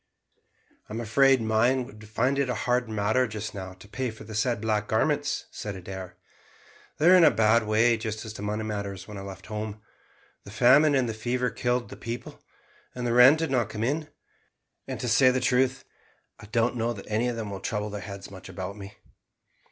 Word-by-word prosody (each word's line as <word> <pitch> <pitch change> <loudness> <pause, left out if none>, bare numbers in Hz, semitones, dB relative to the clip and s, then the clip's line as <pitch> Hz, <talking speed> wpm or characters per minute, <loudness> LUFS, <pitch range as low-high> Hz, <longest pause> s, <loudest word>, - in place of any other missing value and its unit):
"I'm 110 +2 -4
afraid 130 +2 +4
mine 120 +4 +2
would 110 -1 -13
find 125 +5 +1
it 140 -2 +1
a 125 - 0
hard 125 -1 +1
matter 110 +4 +1
just 110 -1 -6
now 95 -2 -7
to 95 +2 -15
pay 130 +4 -3
for 110 -1 -10
the 110 +1 -10
said 110 +1 0
black 105 -1 -1
garments," 110 - 0
said 105 -2 -6
Adair. 95 0 -8 0.8
"They 160 - +3
were - - +8
in 180 - +7
a - - +8
bad 110 +1 +3
way 115 +2 +4
as 110 -1 -2 0.2
to 105 - -9
money 105 +1 -2
matters 100 -3 -5
when 105 -2 -8
I - - -6
left 95 -1 -9
home. 105 0 -5 0.6
The - - -12
famine 135 +7 +5
and 130 -2 +2
the 115 - -2
fever 125 +3 -1
killed 125 0 -1
the - - -9
people, 120 +1 -7 0.5
and 125 -1 -3
rent 125 +5 +8
did 160 -3 -2
not 120 -5 +1
come 110 0 -4
in; 150 +5 -1 0.8
and - - -5
to 125 - -2
say 130 +3 +5
the 130 0 +1
truth, 130 0 +1 0.5
I 105 - -12
don't 115 +2 +1
know 115 +1 0
that 100 - -10
any 110 +3 0
of 120 - -2
them 110 -3 -5
will 95 - -6
trouble 105 -1 -3
their 105 -1 -5
heads 100 0 -8
much 95 -1 -11
about 95 +1 -6
me." 100 -1 -10
110 Hz, 205 wpm, -27 LUFS, 105-125 Hz, 0.8 s, were